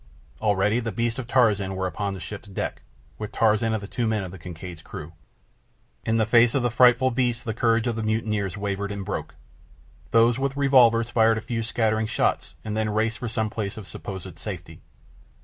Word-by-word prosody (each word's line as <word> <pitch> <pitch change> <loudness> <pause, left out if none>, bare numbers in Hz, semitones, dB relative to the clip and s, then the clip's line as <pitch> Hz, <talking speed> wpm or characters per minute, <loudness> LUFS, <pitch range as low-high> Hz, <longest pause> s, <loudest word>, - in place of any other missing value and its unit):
Already 105 +1 +2
the 115 -2 -3
beasts 115 +4 -1
of 125 - -5
Tarzan 105 -7 +2
were 95 0 -2
upon 100 +1 -2
the - - -7
ship's 105 +2 -8
deck, 95 - -4 0.4
with 105 -1 -5
Tarzan 110 0 +2
and 110 -2 -2
the - - -6
two 120 +2 -1
men 110 -2 0
of 90 - -6
the 95 - -10
Kincaid's 85 0 -8
crew. 75 +2 -9 0.9
In 115 0 +1
the 110 - +3
face 115 +2 +5
of 135 - +2
the 120 - +1
frightful 125 +2 +5
beasts 120 -1 0
the 110 - -3
courage 115 0 +2
of 120 -2 0
the 115 - -2
mutineers 110 -3 -1
wavered 100 0 -2
and 100 -1 -5
broke. 105 - -4 0.7
Those 115 +2 +4
with 135 0 -1
revolvers 120 -4 +5
fired 115 -1 +4
a - - -3
few 115 0 -3
scattering 110 -1 0
shots - - 0
and 105 -1 -3
then 110 0 0
raced 110 +2 0
for 120 - -3
some 110 -1 -1
place 105 -2 -4
of 110 - -7
supposed 95 -3 -8
safety. 85 -6 -7
110 Hz, 200 wpm, -25 LUFS, 100-115 Hz, 0.9 s, face